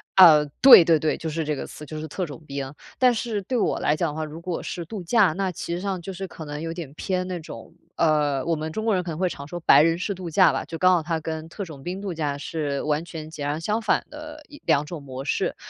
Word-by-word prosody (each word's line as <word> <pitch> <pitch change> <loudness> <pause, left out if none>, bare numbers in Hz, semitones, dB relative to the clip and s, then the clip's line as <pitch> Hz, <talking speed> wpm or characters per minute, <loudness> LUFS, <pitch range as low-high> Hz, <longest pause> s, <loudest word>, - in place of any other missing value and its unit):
呃， 160 -5 +8 0.2
对 260 -9 +11
对 165 -2 +3
对， 155 - 0
就 160 - -4
是 160 +1 -2
这 150 0 -1
个 - - -5
词， 150 - -10
就 155 +2 -7
是 155 - -5
特 180 +5 -3
种 150 0 -10
兵。 140 -1 -5 0.3
但 250 -1 +5
是 220 -3 -2
对 250 +6 -2
我 - - 0
来 150 - +2
讲 165 +1 0
的 150 - -7
话， 155 0 -3
如 155 +2 -9
果 175 -1 -3
是 175 - -5
度 205 +3 -6
假， 190 0 +3
那 190 +1 -1
其 170 0 -5
实 175 - -2
上 195 -3 -3
就 190 +3 -6
是 190 +1 -6
可 160 - -10
能 145 0 -6
有 165 0 -4
点 160 -5 -7
偏 185 +3 -2
那 180 -1 -4
种， 160 0 -10 0.2
呃， 150 -4 +1
我 165 -1 +1
们 155 +1 -4
中 220 - -3
国 225 -2 +2
人 185 - +1
可 175 -2 -5
能 155 - -5
会 185 0 +1
常 140 -2 -8
说 175 - -6
白 150 - +7
人 165 +1 +3
式 200 +3 -2
度 185 -2 -7
假 185 +4 +5
吧， - - -3
就 165 - -6
刚 185 +2 +5
好 175 - +3
它 160 +1 -2
跟 160 0 -5
特 200 +5 -6
种 155 -7 -10
兵 185 +4 -5
度 195 -3 -4
假 150 -3 -2
是 145 -2 -3
完 150 +1 0
全 160 -2 -8
截 150 -3 -6
然 145 +2 -1
相 215 +5 -1
反 - - +1
的 305 0 -9
一 290 - -13
两 145 +1 +3
种 165 -1 -7
模 135 -1 -7
式。 140 - -1
165 Hz, 305 characters per minute, -24 LUFS, 150-185 Hz, 0.3 s, 对